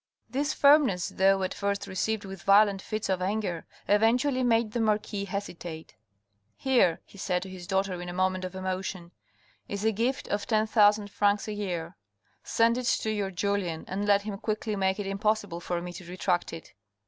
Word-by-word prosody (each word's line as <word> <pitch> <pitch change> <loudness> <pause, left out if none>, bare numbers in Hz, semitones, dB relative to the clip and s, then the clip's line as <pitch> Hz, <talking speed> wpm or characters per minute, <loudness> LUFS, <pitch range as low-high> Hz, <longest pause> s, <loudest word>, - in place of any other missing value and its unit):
This 280 +5 -1
firmness 280 - +4
though 195 0 +3
at 185 - -2
first 200 0 -2
received 210 +2 -2
with 195 -2 -8
violent 200 0 +5
fits 215 +1 -3
of 190 -1 0
anger, 190 -3 -2 0.2
eventually 245 +6 +3
made 230 -2 +2
the 235 - -2
marquis 210 -2 0
hesitate. 175 -5 -6 0.3
" 100 - -48 0.2
Here," 245 -11 +2
he 200 - -16
said 180 -2 -1
to 190 - -8
his 180 -2 -9
daughter 190 -2 -1
in 175 - -6
a - - -4
moment 185 +1 0
of 185 0 -5
emotion, 185 -2 -4 0.3
" - - -35
is 200 +1 -3
a 220 - +4
gift 235 +5 -1
of 205 0 -2
ten 215 -1 +2
thousand 210 -2 +3
francs 205 0 +1
a 215 - -3
year. 180 -5 -4 0.5
Send 230 +2 +2
it 250 - -4
to 220 - +1
your 205 -2 -1
Julien, 185 -3 -2
and 200 +2 -3
let 200 0 +4
him 205 -2 -5
quickly 215 -1 -2
make 190 0 0
it 205 - -3
impossible 205 -2 -1
for 175 0 -3
me 175 0 -6
to 175 -1 -10
retract 180 -1 -1
it." 165 -1 -10
200 Hz, 195 wpm, -28 LUFS, 185-215 Hz, 0.5 s, violent